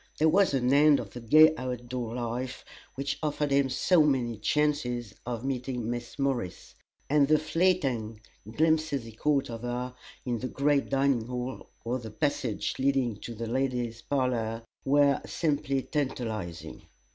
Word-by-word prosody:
There 160 +1 +4
was 190 -3 +3
an 130 0 +2
end 145 0 +6
of - - -7
the 125 - -7
gay 155 +7 +6
out 125 -1 -4
door 120 -2 -4
life 125 +2 -4 0.3
which 140 +1 -3
offered 150 -1 -1
him 140 -1 +3
so 160 +6 +3
many 130 -6 +1
chances 125 -2 0
of 120 0 -3
meeting 125 -3 -2
Miss 120 0 -6
Morris, 130 -10 -2 0.3
and 145 -1 +4
the 155 +1 +5
fleeting 150 - 0 0.3
glimpses 155 -1 +1
he 115 - -10
caught 140 +3 0
of 115 -1 -6
her 125 +1 -3 0.3
in 120 -2 -1
the 130 - -3
great 140 +1 +1
dining 135 -4 +1
hall 125 +1 -5 0.2
or 125 +2 -1
the 115 -2 -8
passage 125 -2 -1
leading 130 -5 +1
to 115 +2 -8
the 115 +2 -4
ladies' 120 -1 -1
parlor 115 -5 -1 0.2
were 140 0 +3
simply 140 -4 0
tantalizing. 110 - -4
130 Hz, 155 wpm, -28 LUFS, 120-145 Hz, 0.3 s, end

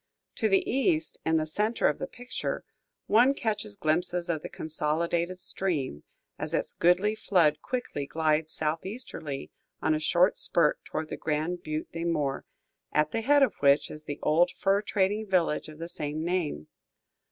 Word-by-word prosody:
To 220 - +2
the 195 -1 +3
east, 315 +5 +1
in 160 0 +3
the 155 - +1
centre 210 +9 +1
of 150 - 0
the - - -3
picture, 245 0 -4 0.4
one 245 +6 +5
catches 215 -3 -2
glimpses 175 +1 0
of 160 -3 0
the - - -6
consolidated 170 +3 -1
stream, 150 - -2 0.4
as - - -2
its - - -1
goodly 180 +5 +3
flood 170 -8 +2
quickly 245 - -3
glides 155 0 +1
southeasterly, 160 - -4 0.3
on 155 - +2
a 155 - +1
short 175 +5 +3
spurt 165 -3 +2
toward 155 0 -4
the - - -3
Grand 160 +3 -1
Butte 155 -1 -4
des 165 0 -4
Morts, 150 -5 -1 0.4
at 150 0 +2
the 225 - -1
head 285 +4 +5
of 245 -8 +2
which 140 +1 +4
is 155 0 -9
the 145 -1 -4
old 170 +4 +4
fur 195 +3 +1
trading 205 +1 0
village 175 -5 +1
of 155 - -11
the 165 +1 -5
same 155 -1 -3
name. 170 - -1
170 Hz, 165 wpm, -28 LUFS, 155-200 Hz, 0.4 s, one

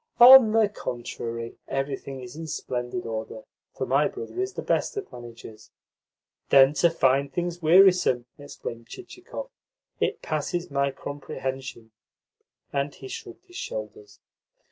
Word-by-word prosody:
"On 245 -2 +10
the 220 -1 +4
contrary, 115 - -6
everything 135 -1 -4
is 125 +1 -10
in 160 +1 -7
splendid 125 +4 -4
order, 110 -1 -5 0.3
for - - -2
my - - +3
brother 410 -3 -6
is 385 +1 -3
the - - -5
best 455 - 0
of 400 - -5
managers." 115 -2 -11 0.8
"Then 135 +1 +7
to 170 +3 +3
find 140 -3 +2
things 175 +3 -3
wearisome!" 175 -7 +5
exclaimed 115 -5 -8
Chichikov. 380 +7 -9 0.5
"It - - -1
passes 175 -4 -3
my 140 0 +1
comprehension." 135 -4 -6 0.8
And 140 0 -1
he - - -10
shrugged 390 - -9
his 360 0 -12
shoulders. 430 -4 -7
145 Hz, 130 wpm, -26 LUFS, -, 0.8 s, On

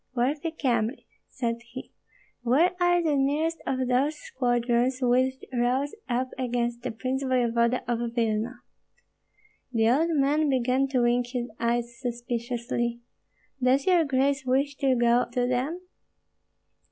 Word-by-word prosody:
"Worthy 285 +6 0
Kyemlich," 245 -5 -1 0.2
said 235 -2 -3
he, 245 +2 -10 0.5
"where 270 +9 +3
are 350 0 +3
the 305 -3 +2
nearest 295 +4 0
of 260 -1 0
those 270 +5 +2
squadrons 245 -2 0
which 255 +1 +2 0.2
rose 255 +4 0 0.2
up 250 +2 0
against 240 -1 -1
the 250 - -3
prince 255 +4 -3
voevoda 240 -2 +1
of 235 -1 -2
Vilna?" 230 +1 -1 1.1
The 225 -1 +3
old 315 +6 +2
man 290 +2 +2
began 260 +1 +2
to 260 -2 +1
wink 240 0 +2
his 245 -1 -4
eyes 235 0 -1
suspiciously. 240 -1 -3 0.6
"Does 260 +2 +3
your 360 -3 +4
grace 275 0 +1
wish 270 +3 +1
to 265 -2 +2
go 240 0 +3
to 245 -1 +1
them?" 260 +8 -1
250 Hz, 130 wpm, -26 LUFS, 240-275 Hz, 1.1 s, your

